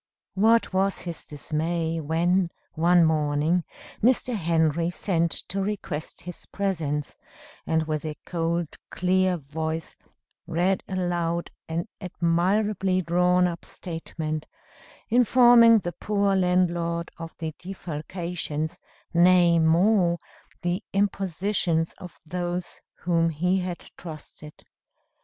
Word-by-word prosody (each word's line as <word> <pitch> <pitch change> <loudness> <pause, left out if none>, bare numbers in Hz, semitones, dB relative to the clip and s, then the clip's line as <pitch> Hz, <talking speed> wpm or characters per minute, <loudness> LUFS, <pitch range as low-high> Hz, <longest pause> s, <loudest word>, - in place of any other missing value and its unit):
What 225 +2 +3
was 195 +1 +1
his 170 -2 -7
dismay 160 +3 -2
when, 170 +4 +1 0.2
one 170 +1 +4
morning, 155 +2 +1 0.4
Mr. 250 +1 +2
Henry 165 -2 +1
sent 170 -2 0 0.2
to 195 +1 -1
request 190 -6 -4
his 180 -1 -9
presence, 155 -8 -2 0.5
and, 160 0 +2
with 155 -2 -3
a 155 -1 -4
cold, 170 -1 -2
clear 185 0 +1
voice, 160 +2 -4 0.5
read 180 +3 +1
aloud 175 -2 -1 0.2
an 165 +5 -2
admirably 185 +2 +1
drawn 180 +1 +3
up 170 -1 -3
statement, 160 -2 -5 0.6
informing 240 -1 +7
the 175 -4 -3
poor 200 +2 0
landlord 175 -2 +1
of 165 -1 -8
the 160 -1 -4
defalcations, 170 -3 -5 0.3
nay 175 -1 +5
more, 170 +2 +3 0.5
the 175 +3 -1
impositions 190 -4 0
of 180 -2 -11
those 175 +1 -4 0.2
whom 165 -1 +2
he 180 +4 +1
had 180 -1 -5
trusted. 155 -2 -11
175 Hz, 105 wpm, -25 LUFS, 165-185 Hz, 0.6 s, informing